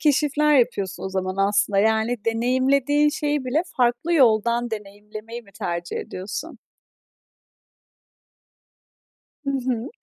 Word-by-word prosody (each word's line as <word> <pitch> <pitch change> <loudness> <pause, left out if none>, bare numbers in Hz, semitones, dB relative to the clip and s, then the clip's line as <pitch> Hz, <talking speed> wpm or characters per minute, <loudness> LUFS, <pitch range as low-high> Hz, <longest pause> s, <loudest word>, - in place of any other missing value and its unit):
keşifler 300 0 +3
yapıyorsun 200 -6 -1
o - - -2
zaman 185 0 -3
aslında. 205 -1 +1
Yani 220 +2 +1
deneyimlediğin 260 +5 +2
şeyi 295 -2 -1
bile 280 +7 +1
farklı 245 +7 +1
yoldan 235 -2 +3
deneyimlemeyi 210 +2 -8
mi 200 -2 -21
tercih 170 -1 -4
ediyorsun? 200 - -6 2.9
Hı 275 - -1
hı. 255 -3 -2
235 Hz, 100 wpm, -23 LUFS, 205-275 Hz, 2.9 s, keşifler